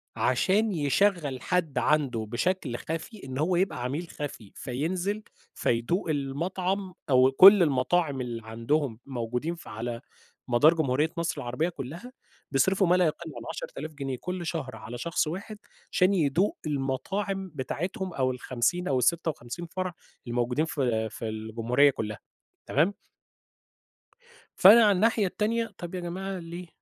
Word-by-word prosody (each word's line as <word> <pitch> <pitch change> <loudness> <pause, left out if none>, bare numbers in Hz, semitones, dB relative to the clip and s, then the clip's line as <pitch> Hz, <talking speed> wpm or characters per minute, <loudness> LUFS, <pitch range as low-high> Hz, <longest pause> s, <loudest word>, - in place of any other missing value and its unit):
عشان 200 - +2
يشغّل 150 -3 +1
حد 165 -7 -1
عنده 125 -4 +1
بشكل 125 - -1
خفي 165 +6 -6
إن 130 -1 -5
هو 165 +5 +1
يبقى 175 -8 0
عميل 145 +8 -3
خفي، 130 -8 -7
فينزل، 180 - -2 0.3
فيدوق 120 - 0
المطعم 180 +7 -2 0.2
أو 130 0 +5
كل 195 +6 +9
المطاعم 140 0 +1
اللي 120 -2 -4
عندهم 115 +2 -1
موجودين 125 +5 -3
في 170 - -12
على 115 +2 -5 0.5
مدار 140 +7 +5
جمهورية 150 0 +1
مصر 170 0 -2
العربية 125 +8 -1
كلّها، 170 - -8 0.4
بيصرفوا 190 +7 +3
ما 180 - +5
لا 180 - +4
يقل 160 +1 -3
عن - - -7
10.000 - - -6
جنيه 135 -3 -4
كل 180 -1 -4
شهر 145 -7 -4
على 110 +2 -8
شخص 165 +4 0
واحد 200 +6 -5 0.3
عشان 185 +1 +3
يدوق 175 +3 +1
المطاعم 190 +8 -2
بتاعتهم 180 +7 -3
أو 130 -3 +1
ال50 130 +8 -1
أو 135 - +2
ال56 155 +1 -1
فرع 185 +1 -4 0.3
الموجودين 120 +5 0
في 120 -8 -1
في 110 +1 -5
الجمهورية 115 +5 +2
كلّها، 105 -4 -5 0.5
تمام؟ 165 +8 +2 1.6
فأنا 220 +5 +9
على 210 - +6
الناحية 210 +2 +3
التانية، 225 +4 0
طب 175 +1 -6
يا - - -2
جماعة 185 +2 -4
ليه؟ 170 +1 -8
155 Hz, 140 wpm, -27 LUFS, 125-185 Hz, 1.6 s, كل